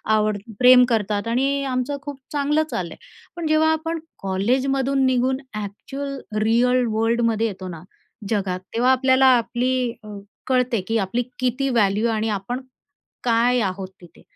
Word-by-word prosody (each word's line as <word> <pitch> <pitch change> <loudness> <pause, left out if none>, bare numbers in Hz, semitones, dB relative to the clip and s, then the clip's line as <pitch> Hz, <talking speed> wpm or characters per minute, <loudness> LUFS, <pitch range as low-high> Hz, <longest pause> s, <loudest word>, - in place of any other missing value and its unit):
आवड 215 -1 +1 0.2
प्रेम 250 0 +8
करतात 210 -1 0
आणि 275 +4 +1
आमचं 260 +1 -2
खूप 285 -2 -8
चांगलं 295 +1 +1
चाललं 175 -2 -3
आहे. - - -18 0.3
पण 340 -2 -3
जेव्हा 310 +1 +3
आपण 325 +1 -2 0.2
कॉलेजमधून 265 +7 +1
निघून 260 0 +2 0.2
ॲक्चुअल 275 +7 -6 0.2
रियल 245 +3 +3
वर्ल्डमध्ये 230 0 +1
येतो 190 -3 -7
ना, 170 -2 -8 0.5
जगात, 190 -4 -1
तेव्हा 245 +3 +3
आपल्याला 260 0 +4
आपली 250 +1 -1
अ, - - -12 0.4
कळते, 250 -4 +1
की 225 - +1
आपली 210 +4 -1 0.2
किती 255 +2 0
व्हॅल्यू 215 -2 +2
आणि 220 0 -1
आपण 210 +5 -3 0.6
काय 240 +1 +3
आहोत 190 -2 -3
तिथे. 175 - -17
245 Hz, 140 wpm, -22 LUFS, 215-265 Hz, 0.6 s, प्रेम